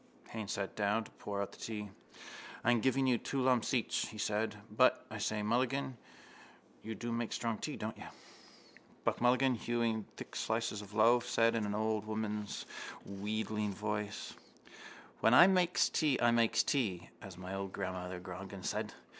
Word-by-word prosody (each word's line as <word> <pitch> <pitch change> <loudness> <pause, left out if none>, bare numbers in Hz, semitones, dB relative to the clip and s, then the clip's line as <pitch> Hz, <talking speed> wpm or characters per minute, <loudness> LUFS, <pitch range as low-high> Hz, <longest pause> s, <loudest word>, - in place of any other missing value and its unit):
_ - - -19
Haines 110 -3 -4
sat 100 -1 -3
down 105 +2 +1
to - - -14
pour 100 -1 -3
out - - -7
the - - -15
tea. 105 -3 -5 0.7
—I'm 120 -1 +4
giving 135 +2 +2
you 125 -3 +3
two 140 - -2
lumps 125 -2 +3
each, 125 -4 +1
he 110 - -9
said. 105 +1 0 0.2
But, - - +4
I - - -5
say, 105 -1 -1
Mulligan, 130 +4 +1 0.9
you 110 0 -5
do 120 +1 -4
make 115 -1 -1
strong 115 -2 -1
tea, - - -3
don't - - -4
you? - - -8 1.0
Buck - - 0
Mulligan, 130 +2 +4
hewing 115 -2 0
thick - - -8
slices 110 -2 -1
from 105 - -8
the 105 +2 -9
loaf, 120 +2 +5
said 115 0 +3
in 110 -3 0
an 105 - -2
old 110 0 0
woman's 105 -1 -3 0.4
wheedling 105 +1 -2
voice: 105 0 -3 0.9
—When 110 +3 +5
I 175 - +11
makes 180 -2 +4
tea 150 -5 +2
I 120 0 +5
makes 115 -1 +4
tea, 100 - 0
as 95 -3 -9
old 95 +1 -5
mother 90 -1 -3
Grogan 95 +1 -8
said. - - -2
110 Hz, 170 wpm, -34 LUFS, 105-120 Hz, 1.0 s, I